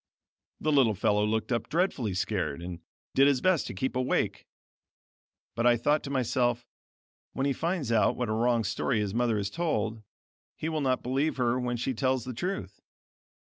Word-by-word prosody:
The 155 - 0
little 130 -7 +4
fellow 105 +1 +2
looked 110 +2 -1
up 120 - -1
dreadfully 150 - 0
scared, 95 -6 -1
and 85 -1 -6 0.3
did 135 +1 +5
his 140 -3 +3
best 185 -1 +2
to - - -5
keep 130 +7 -2
awake: 130 0 0 1.1
but 115 +1 +1
I 120 -1 +5
thought 145 +6 +2
to - - -5
myself, 125 -2 0 0.7
when 135 - -1
he 140 - +2
finds 165 -5 -2
out 115 -2 +3
what 125 - -1
a - - -2
wrong 115 +1 +2
story 115 +2 0
his 100 -2 -2
mother 120 -1 +1
has 100 -1 -2
told, 115 -10 -1 0.5
he 160 - -3
will 155 -2 -1
not 130 -2 +1
believe 135 +5 0
her 120 -2 +2
even 125 +1 -1
when 120 0 -1
she 125 +3 -1
tells 130 0 0
the 130 - -5
truth. 185 - -4
125 Hz, 185 wpm, -28 LUFS, 110-140 Hz, 1.1 s, did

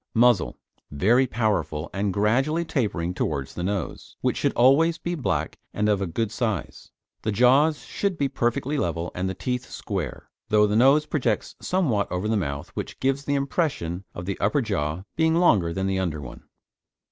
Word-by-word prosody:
MUZZLE 120 -4 +4 0.3
Very 115 - +3
powerful, 95 -10 -1
and 100 +1 0
gradually 130 - +1
tapering 100 - -1
towards 70 -6 -2
the - - -5
nose, 95 0 -4
which - - +1
should - - +1
always 150 +7 +4
be 175 - -3
black 150 -7 -2 0.2
and 105 0 +1
of 105 -2 +2
a 95 - -1
good 100 +6 -2
size. 110 -3 -3 0.3
The 110 - -1
jaws 135 +8 +4
should 200 -3 -2
be 140 - +1
perfectly 135 +4 -1
level, 85 0 -2
and 95 +1 -2
the 95 - -4
teeth 125 +6 -3
square, - - -5 0.2
though 105 0 +5
the 105 0 0
nose 135 +6 +5
projects 150 -4 -1
somewhat 140 - 0
over 90 +3 -1
the 110 - +1
mouth 70 -8 -3
which - - -6
gives 135 +1 0
the 145 - +1
impression 135 - -1
of 90 - -6
the 100 +1 -3
upper 110 +7 +2
jaw 90 -5 -2
being 160 0 +3
longer 105 - +4
than 95 +2 -2
the 95 0 0
under 85 -5 -2
one. 65 -3 -10
110 Hz, 180 wpm, -25 LUFS, 90-135 Hz, 0.3 s, though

